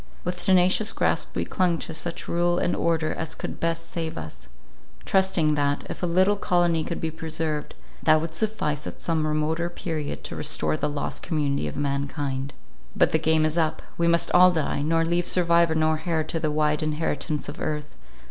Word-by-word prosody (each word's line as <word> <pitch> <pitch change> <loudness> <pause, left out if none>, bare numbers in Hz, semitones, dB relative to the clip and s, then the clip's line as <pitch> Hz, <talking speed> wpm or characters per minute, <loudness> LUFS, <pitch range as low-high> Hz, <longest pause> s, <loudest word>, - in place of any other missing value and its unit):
With 180 0 -3
tenacious 185 +3 +3
grasp - - 0
we - - -1
clung 180 -2 +1
to 160 - -5
such 165 +2 -4
rule 175 0 +1
and 175 - +1
order 165 -2 0
as 160 0 -4
could - - -6
best 165 0 -1
save 165 -2 -3
us; 80 -6 -8 0.6
trusting 190 -5 +2
that, 145 -1 0
if - - -7
a 180 - 0
little 185 +4 +3
colony 175 -4 +2
could 170 - -4
be 160 - -2
preserved, 160 -1 -4 0.3
that 155 0 +5
would 160 0 -4
suffice 160 -6 -1
at - - -7
some 160 -2 0
remoter 155 +3 0
period 160 -4 -4
to - - -6
restore 75 0 0
the 150 - -1
lost 145 0 -4
community 145 -3 -1
of - - -6
mankind. 140 -1 -2 0.4
But - - +3
the - - +2
game 160 0 +3
is 155 +2 0
up! 160 -1 0
We 170 - +1
must 170 0 +3
all 180 +1 +7
die; 160 -4 -1
nor 165 +2 +2
leave 175 +1 0
survivor 170 -2 +3
nor 155 0 +1
heir 160 -2 +1
to 160 +1 -3
the 155 -1 0
wide 150 0 +1
inheritance 155 0 -2
of - - -7
earth. 150 -1 -3
160 Hz, 190 wpm, -25 LUFS, 150-170 Hz, 0.6 s, all